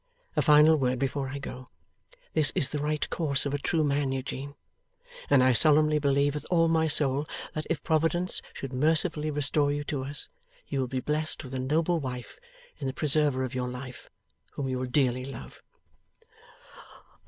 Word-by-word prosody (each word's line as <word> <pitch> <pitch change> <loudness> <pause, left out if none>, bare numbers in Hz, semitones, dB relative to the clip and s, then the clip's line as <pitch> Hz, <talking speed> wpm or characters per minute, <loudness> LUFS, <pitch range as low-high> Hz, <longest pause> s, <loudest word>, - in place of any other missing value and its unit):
A - - +2
final 150 +1 +6
word 130 -2 0
before 135 +1 -2
I 140 - -5
go. 130 -2 -8 0.6
This 155 -2 +3
is 135 - +2
the 150 - -3
right 150 +1 -1
course 145 -5 +1
of 140 - -2
a 145 - -1
true 160 +2 0
man, 140 -2 0
Eugene. 135 +1 -5 0.7
And 135 -3 +5
I 130 0 +4
solemnly 150 +4 +4
believe, 140 0 +1
with 150 - -5
all 165 -2 +3
my 160 -1 +2
soul, 145 -1 +4 0.3
that 155 - -5
if 165 - -2
Providence 165 +3 +1
should 135 -1 -7
mercifully 155 +3 +2
restore 145 0 +1
you 145 0 -2
to 145 -2 -4
us, 145 +2 +1 0.4
you 135 - -3
will 130 - -1
be 130 +1 -3
blessed 155 +2 -2
with 130 -1 -10
a 130 - -3
noble 160 +6 0
wife 125 - -7 0.4
in 140 - -3
the 130 - -3
preserver 145 -2 +2
of 130 - -4
your 125 -1 -2
life, 125 0 -9 0.4
whom 140 - -4
you 130 -1 -2
will 130 - -3
dearly 125 -1 +1
love. 130 - -10
145 Hz, 180 wpm, -27 LUFS, 130-155 Hz, 0.7 s, final